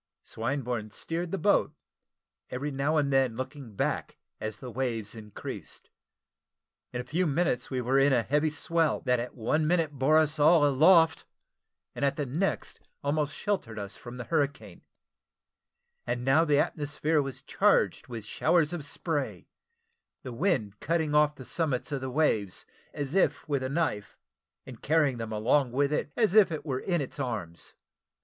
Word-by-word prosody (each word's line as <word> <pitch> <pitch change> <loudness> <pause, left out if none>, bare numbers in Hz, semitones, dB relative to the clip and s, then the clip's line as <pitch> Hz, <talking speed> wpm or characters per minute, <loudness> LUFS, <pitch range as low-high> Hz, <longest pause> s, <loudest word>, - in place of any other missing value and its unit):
Swinburne 120 -2 -3
steered 165 +10 -4
the 195 - -2
boat, 200 +1 +2 0.7
every 140 +4 -3
now 140 +3 0
and 140 -2 +1
then 130 -4 +2
looking 130 -3 -7
back - - -2 0.2
as 110 -1 -4
the 125 +1 -8
waves 115 -4 -2
increased. 105 -3 -8 1.0
In 125 - -4
a - - -3
few 165 +8 0
minutes 145 -5 0
we 130 -2 -2
were 130 +3 +2
in 140 +1 +4
a 120 -3 +3
heavy 150 +5 +1
swell, 165 +2 0
that 125 -2 +1
at 120 +1 -5
one 150 +7 0
minute 165 -2 +2
bore 145 +3 +3
us 155 -1 +2
all 155 +1 +6
aloft, 160 +4 +5 0.7
and - - -5
at 140 0 +2
the 145 - -2
next 160 +10 -2 0.2
almost 145 +1 0
sheltered 190 - -2
us 100 -1 -6
from 120 0 -10
the 125 - -5
hurricane: 145 -1 -2 1.3
and 125 0 -2
now 140 +5 +5
the 150 -2 +3
atmosphere 150 +1 0
was 135 -2 -6
charged - - +2
with 115 -4 -7
showers 160 +5 +2
of 170 -4 -4
spray, 145 0 -3 0.8
the 130 -3 -6
wind 115 - 0
cutting 160 -1 0
off 150 0 +4
the 130 - -10
summits 145 -3 -2
of 140 -2 -2
the 130 - -3
waves, 120 - 0 0.3
as 145 0 -4
if 190 -2 +1
with 140 -3 0
a 130 - -2
knife, 140 -9 -2 0.5
and - - -11
carrying 150 -4 +2
them 115 -1 -5
along 120 +5 +2
with 140 +3 +1
it 150 - -1
as 220 -6 +2
it 185 -8 +4
were 130 -4 -2
in 175 0 -1
its 140 +2 -6
arms. 105 -11 -5
140 Hz, 165 wpm, -28 LUFS, 125-155 Hz, 1.3 s, all